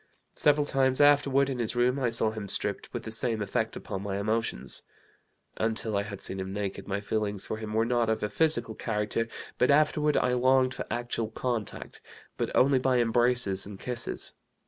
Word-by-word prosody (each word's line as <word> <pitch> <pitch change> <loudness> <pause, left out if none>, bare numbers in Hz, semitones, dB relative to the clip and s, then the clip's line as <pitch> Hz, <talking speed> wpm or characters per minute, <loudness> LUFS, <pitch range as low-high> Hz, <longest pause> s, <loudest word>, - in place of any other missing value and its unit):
Several 145 0 +3
times 130 -2 +1
afterward, 140 -1 +4
in 130 -2 -3
his 115 0 -1
room, 125 +3 +2
I 125 -3 +1
saw 115 -1 +2
him 110 -2 -6
stripped, - - 0
with - - -5
the 110 - -6
same 115 0 -1
effect 105 - -2
upon 95 - -5
my 100 -1 -3
emotions. 105 - -1 0.8
Until 110 -1 +1
I 100 - +2
had 100 -1 -7
seen 95 - -4
him 95 0 -4
naked 100 -1 -4
my 100 0 -1
feelings 105 -1 -2
for 110 - -4
him 110 -1 -5
were 115 +1 +3
not 120 -1 +1
of 110 - 0
a 105 - 0
physical 120 -6 +1
character, 105 +1 -2 0.3
but 125 - +3
afterward 150 +1 +3
I 125 - +2
longed 130 +1 +3
for - - -5
actual 120 -1 -2
contact, 115 -2 -4 0.3
but - - -2
only 135 0 +4
by 130 0 +2
embraces 120 -4 +2
and 100 -2 -9
kisses. 120 -2 -4
115 Hz, 190 wpm, -28 LUFS, 105-130 Hz, 0.8 s, afterward